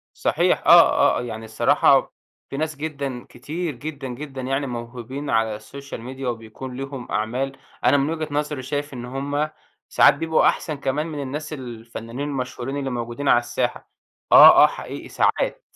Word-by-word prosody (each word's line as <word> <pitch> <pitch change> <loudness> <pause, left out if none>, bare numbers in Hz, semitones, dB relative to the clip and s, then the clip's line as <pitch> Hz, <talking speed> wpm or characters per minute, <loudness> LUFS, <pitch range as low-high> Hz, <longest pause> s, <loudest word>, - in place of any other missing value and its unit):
صحيح - - +1
آه، - - +6
آه، - - -2
يعني 110 -2 -6
الصراحة 110 0 +3 0.4
في 140 - -5
ناس 155 0 -2
جدًا، 140 -4 -5
كتير 155 +5 -5
جدًا، 145 0 -6
جدًا، 135 +1 -7
يعني 135 +2 -1
موهوبين 120 +3 -6
على 110 -2 +1
الSocial 140 0 -9
Media 130 +3 -9
وبيكون 120 +2 -6
ليهُم 135 -2 -7
أعمال، 130 +6 -2 0.3
أنا 145 - +5
من 140 +2 +1
وجهة 160 -1 -3
نظري 150 -2 -2
شايف 145 +1 -3
إن 120 -1 -6
هُم، 145 +4 -2 0.4
ساعات - - +6
بيبقوا 160 -1 +2
أحسن 155 -3 -1
كمان 145 +4 -2
من 150 -3 -5
الناس 150 +3 -5
الفنانين 120 +1 -7
المشهورين 130 0 -4
اللي 135 -1 -2
موجودين 120 +3 -4
على - - +6
الساحة، 120 -1 -3 0.4
آه، - - +10
آه، - - +8
حقيقي - - -8
ساعات. - - 0
135 Hz, 160 wpm, -23 LUFS, 120-145 Hz, 0.4 s, آه